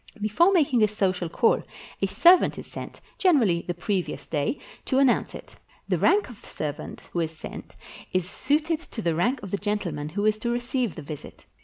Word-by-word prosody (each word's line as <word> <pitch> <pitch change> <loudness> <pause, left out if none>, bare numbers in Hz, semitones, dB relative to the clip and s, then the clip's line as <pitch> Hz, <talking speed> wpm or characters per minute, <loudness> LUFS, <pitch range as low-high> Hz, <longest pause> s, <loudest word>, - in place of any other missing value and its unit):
Before 215 - +3
making 285 - +3
a 215 - +6
social 185 -4 -1
call, 225 +7 +3 0.4
a - - +2
servant 350 +1 +5
is - - -7
sent - - -9 0.2
(gener 345 -9 +5
ally 170 -5 +2
the 175 - -2
previous 185 +1 -2
day) 150 - -1 0.3
to 260 - +1
announce 270 -3 +3
it. - - -11 0.3
The - - +1
rank 410 +1 +4
of 240 -5 -12
the - - -15
servant 150 -2 -5
who 175 - 0
is 160 -1 -2
sent - - -9 0.4
is 185 -1 0
suited 305 - 0
to 240 -9 -8
the 170 - +1
rank 245 +10 0
of 195 - -7
the 200 - 0
gentle 205 -3 -2
man 150 0 -5
who 205 +6 -2
is 215 0 +2
to 235 - -2
receive 240 -2 -1
the 155 - -7
visit. 150 0 -9
210 Hz, 205 wpm, -26 LUFS, 175-260 Hz, 0.4 s, a